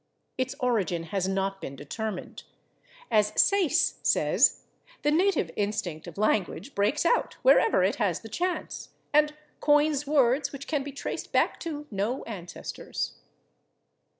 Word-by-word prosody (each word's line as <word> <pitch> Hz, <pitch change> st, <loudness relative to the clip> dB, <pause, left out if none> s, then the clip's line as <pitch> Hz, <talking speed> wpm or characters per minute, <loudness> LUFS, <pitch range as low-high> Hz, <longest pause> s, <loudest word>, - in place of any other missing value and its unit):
Its 255 Hz, 0 st, -2 dB
origin 205 Hz, -9 st, 0 dB
has 190 Hz, +2 st, -2 dB
not 195 Hz, 0 st, -1 dB
been 135 Hz, -, -6 dB
determined. 190 Hz, -, -5 dB, 0.7 s
As 210 Hz, 0 st, +2 dB
Sayce 350 Hz, -5 st, +3 dB
says, -, -, +3 dB, 0.4 s
"the 295 Hz, -, +3 dB
native 345 Hz, -, +2 dB
instinct 200 Hz, -6 st, -2 dB
of -, -, -10 dB
language 210 Hz, -, 0 dB
breaks 210 Hz, +11 st, +1 dB
out 480 Hz, -, +2 dB
wherever 455 Hz, -, +5 dB
it 190 Hz, -, +1 dB
has 200 Hz, -8 st, 0 dB
the 225 Hz, -, -9 dB
chance, 355 Hz, -, -3 dB, 0.2 s
and 300 Hz, 0 st, +4 dB, 0.2 s
coins 295 Hz, -1 st, +3 dB
words 275 Hz, -1 st, +3 dB
which 280 Hz, 0 st, -8 dB
can 295 Hz, -3 st, -1 dB
be 285 Hz, +1 st, -6 dB
traced 280 Hz, -, -5 dB
back -, -, +2 dB
to 300 Hz, -3 st, -5 dB
no 210 Hz, +6 st, -2 dB
ancestors." 185 Hz, -6 st, -6 dB
235 Hz, 135 wpm, -27 LUFS, 195-295 Hz, 0.7 s, wherever